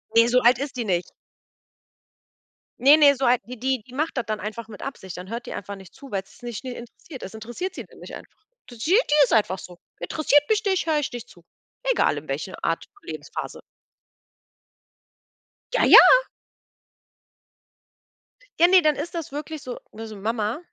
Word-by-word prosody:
Ne, 230 Hz, +1 st, +6 dB
so 250 Hz, +1 st, +4 dB
alt 240 Hz, +1 st, +4 dB
ist 280 Hz, -1 st, -5 dB
die 235 Hz, -, -2 dB
nicht. 180 Hz, -3 st, -1 dB, 1.7 s
Ne, 280 Hz, +5 st, +7 dB
ne, 285 Hz, -2 st, +6 dB
so 265 Hz, -, -5 dB
alt 245 Hz, 0 st, +3 dB
wie 250 Hz, +2 st, -8 dB
die 260 Hz, 0 st, -1 dB
die 250 Hz, -, -17 dB
macht 305 Hz, 0 st, -2 dB
das 240 Hz, -, -1 dB
dann 215 Hz, 0 st, -3 dB
einfach 220 Hz, +2 st, -6 dB
mit 210 Hz, -3 st, -11 dB
Absicht. 190 Hz, -10 st, -7 dB
Dann 185 Hz, +2 st, -9 dB
hört 235 Hz, +1 st, -5 dB
die -, -, -7 dB
einfach 200 Hz, +1 st, -6 dB
nicht 190 Hz, -1 st, -15 dB
zu, 275 Hz, -3 st, -13 dB
weil 195 Hz, -1 st, -2 dB
es -, -, -21 dB
sie 245 Hz, -, -12 dB
nicht 240 Hz, +1 st, -6 dB
nie 255 Hz, -, -4 dB
interessiert. 245 Hz, +4 st, -11 dB
Das 195 Hz, -, -8 dB
interessiert 240 Hz, -, -6 dB
sie -, -, -8 dB, 0.2 s
nicht -, -, -10 dB
einfach. -, -, -15 dB, 0.3 s
Die 240 Hz, -, -11 dB
die 305 Hz, +11 st, 0 dB, 0.3 s
ist -, -, 0 dB
einfach 200 Hz, -4 st, +2 dB
so. 180 Hz, -1 st, -12 dB, 0.2 s
Interessiert 290 Hz, -, +2 dB
mich 435 Hz, +1 st, +2 dB
nicht, 380 Hz, -3 st, +1 dB
höre 310 Hz, -2 st, +1 dB
ich 285 Hz, -, -3 dB
nicht 240 Hz, 0 st, -8 dB
zu. 175 Hz, -, -18 dB, 0.5 s
Egal -, -, +2 dB
in -, -, -8 dB
welcher -, -, -5 dB
Art -, -, -1 dB, 0.2 s
und -, -, -13 dB
Lebensphase. -, -, -7 dB, 2.1 s
Ja, -, -, +2 dB
ja. -, -, +10 dB, 2.6 s
Ja, 345 Hz, -, +7 dB
ne, 370 Hz, 0 st, +6 dB
dann 305 Hz, -2 st, +2 dB
ist 330 Hz, +5 st, -5 dB
das 325 Hz, -5 st, -5 dB
wirklich 305 Hz, 0 st, -6 dB
so 250 Hz, -, -7 dB
ne, 225 Hz, +1 st, -8 dB
so: 215 Hz, -, -9 dB
„Mama, 220 Hz, +5 st, -2 dB
245 Hz, 190 wpm, -24 LUFS, 215-295 Hz, 2.6 s, ja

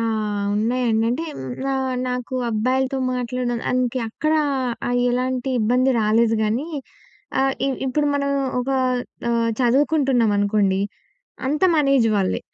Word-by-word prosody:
ఆహ్, 215 Hz, -3 st, -1 dB
ఉన్నాయండి. 230 Hz, 0 st, +1 dB
అంటే 320 Hz, +7 st, -2 dB
హ్మ్, 130 Hz, -, -6 dB, 0.3 s
ఆహ్, 260 Hz, -1 st, -1 dB
నాకు 250 Hz, +1 st, -4 dB, 0.2 s
అబ్బాయిలతో 260 Hz, +4 st, 0 dB, 0.2 s
మాట్లాడడం 245 Hz, -1 st, -2 dB
దానికి 255 Hz, 0 st, 0 dB
ఎక్కడ 310 Hz, +7 st, -1 dB, 0.6 s
ఆహ్, 245 Hz, 0 st, +1 dB
ఎలాంటి 255 Hz, +1 st, -1 dB
ఇబ్బంది 250 Hz, +4 st, +2 dB
రాలేదు 225 Hz, +1 st, +3 dB
గానీ, 225 Hz, +8 st, 0 dB, 0.7 s
ఆహ్, 270 Hz, 0 st, +2 dB
ఇ -, -, +1 dB, 0.2 s
ఇప్పుడు 295 Hz, +3 st, 0 dB
మనం 280 Hz, 0 st, 0 dB, 0.3 s
ఒక 265 Hz, +2 st, -3 dB, 0.6 s
ఆహ్, 230 Hz, -1 st, +1 dB
చదువుకుంటున్నామనుకోండి, 230 Hz, -8 st, +2 dB, 0.7 s
అంతా 300 Hz, +6 st, +2 dB
మన 295 Hz, -2 st, +3 dB
ఏజ్ 225 Hz, -3 st, +3 dB
వాళ్ళే. 190 Hz, -2 st, 0 dB
245 Hz, 125 wpm, -22 LUFS, 220-265 Hz, 0.7 s, రాలేదు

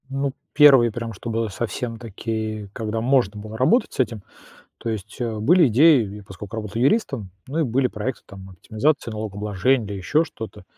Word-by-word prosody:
Ну, 135 Hz, 0 st, -2 dB, 0.2 s
1, 135 Hz, -6 st, +7 dB
прям 115 Hz, 0 st, -5 dB
чтобы 115 Hz, +2 st, -3 dB
совсем 115 Hz, +3 st, -4 dB
такие, 110 Hz, -2 st, -5 dB
когда 110 Hz, -1 st, -3 dB
можно 120 Hz, -5 st, +2 dB
было 110 Hz, +1 st, -8 dB
работать 210 Hz, -, +2 dB
с -, -, -11 dB
этим. 115 Hz, -5 st, -1 dB, 0.6 s
То -, -, -5 dB
есть, 105 Hz, 0 st, -6 dB
э, 115 Hz, -3 st, -2 dB
были 165 Hz, -, +5 dB
идеи, 120 Hz, -5 st, +4 dB
и -, -, -10 dB
поскольку 100 Hz, +3 st, -9 dB
работал 110 Hz, +1 st, -4 dB
юристом, 135 Hz, -, +1 dB, 0.2 s
ну 145 Hz, +5 st, -4 dB
и -, -, +3 dB
были 130 Hz, -1 st, +1 dB
проекты 115 Hz, +3 st, -4 dB
там, 95 Hz, -1 st, -11 dB
оптимизации 115 Hz, -, -1 dB
налогообложения 105 Hz, +3 st, 0 dB
или 100 Hz, -, -5 dB
ещё 125 Hz, -, +1 dB
что-то, 115 Hz, -8 st, -9 dB
115 Hz, 175 wpm, -23 LUFS, 105-130 Hz, 0.6 s, 1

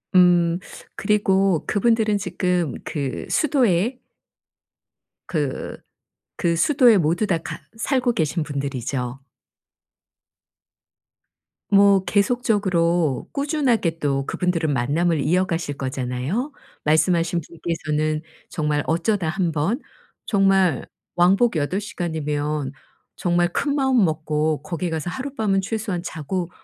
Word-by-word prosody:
음. 175 Hz, -1 st, +5 dB, 0.4 s
그리고 195 Hz, -4 st, +2 dB
그분들은 215 Hz, 0 st, +2 dB
지금 180 Hz, -7 st, -1 dB
그 140 Hz, -4 st, -4 dB
수도에 250 Hz, -, +2 dB, 1.3 s
그 145 Hz, -6 st, -3 dB, 0.6 s
그 170 Hz, -1 st, +1 dB
수도에 245 Hz, -, +5 dB
모두 170 Hz, +6 st, +1 dB
다 170 Hz, -, +2 dB
같 160 Hz, -, -7 dB, 0.2 s
살고 250 Hz, +1 st, +1 dB
계신 160 Hz, -3 st, 0 dB
분들이죠. 135 Hz, -3 st, -3 dB, 2.5 s
뭐 200 Hz, -1 st, +5 dB
계속적으로 190 Hz, -, +1 dB
꾸준하게 270 Hz, -, 0 dB
또 135 Hz, -2 st, 0 dB
그분들은 165 Hz, -3 st, 0 dB
만남을 150 Hz, +6 st, +1 dB
이어가실 165 Hz, 0 st, 0 dB
거잖아요. 130 Hz, -, -3 dB, 0.3 s
말씀하신 165 Hz, +2 st, +2 dB
분께서는 155 Hz, -2 st, -2 dB, 0.3 s
정말 150 Hz, -2 st, -1 dB
어쩌다 170 Hz, +2 st, 0 dB
1 175 Hz, 0 st, 0 dB
번 165 Hz, -, -1 dB, 0.4 s
정말 195 Hz, -, +2 dB, 0.3 s
왕복 190 Hz, +5 st, +4 dB
8 155 Hz, +6 st, 0 dB
시간이면 150 Hz, -, -3 dB, 0.5 s
정말 175 Hz, 0 st, +1 dB
큰마음 265 Hz, -3 st, +2 dB
먹고 155 Hz, -1 st, -1 dB
거기 170 Hz, +3 st, -3 dB
가서 160 Hz, +1 st, -3 dB
하룻밤은 220 Hz, -2 st, -1 dB
최소한 200 Hz, -3 st, -3 dB
자고 175 Hz, +1 st, -4 dB
175 Hz, 225 characters per minute, -22 LUFS, 155-200 Hz, 2.5 s, 음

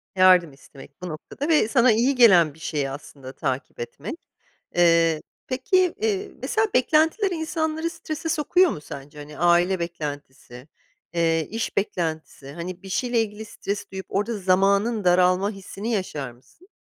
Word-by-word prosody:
Yardım 185 Hz, -4 st, +5 dB
istemek 140 Hz, +3 st, -16 dB
bu 180 Hz, -, -5 dB
noktada 170 Hz, -, -6 dB
ve 305 Hz, -9 st, +4 dB
sana 240 Hz, 0 st, +4 dB
iyi 240 Hz, +5 st, +2 dB
gelen 180 Hz, -, +6 dB
bir 160 Hz, -, -19 dB
şeyi 145 Hz, -3 st, -2 dB
aslında 135 Hz, -1 st, -9 dB
takip 135 Hz, -3 st, -4 dB
etmek. 145 Hz, -, -8 dB, 0.5 s
Iıı, 165 Hz, -2 st, +4 dB, 0.3 s
peki, 360 Hz, +8 st, +1 dB
iii, 415 Hz, -2 st, -1 dB
mesela 435 Hz, -1 st, +1 dB
beklentiler 320 Hz, -, +3 dB
insanları 320 Hz, -1 st, -2 dB
strese 320 Hz, -1 st, -5 dB
sokuyor 345 Hz, +3 st, +3 dB
mu -, -, -6 dB
sence? 145 Hz, +1 st, -10 dB
Hani, 150 Hz, 0 st, -10 dB
aile 175 Hz, +3 st, +3 dB
beklentisi, 145 Hz, -6 st, -7 dB, 0.5 s
ııı, 165 Hz, -1 st, +2 dB
iş 225 Hz, +1 st, -4 dB
beklentisi. 160 Hz, -7 st, -3 dB
Hani, 175 Hz, +3 st, -7 dB
bir 195 Hz, -, -9 dB
şeyle 240 Hz, +4 st, +1 dB
ilgili 215 Hz, 0 st, -5 dB
stres 205 Hz, -1 st, -5 dB
duyup 190 Hz, 0 st, -6 dB
orada 210 Hz, +3 st, -1 dB
zamanın 200 Hz, +4 st, +2 dB
daralma 180 Hz, +2 st, +3 dB
hissini 200 Hz, +3 st, -6 dB
yaşar 150 Hz, -, -3 dB
mısın? 130 Hz, -, -23 dB
190 Hz, 145 wpm, -24 LUFS, 155-250 Hz, 0.5 s, gelen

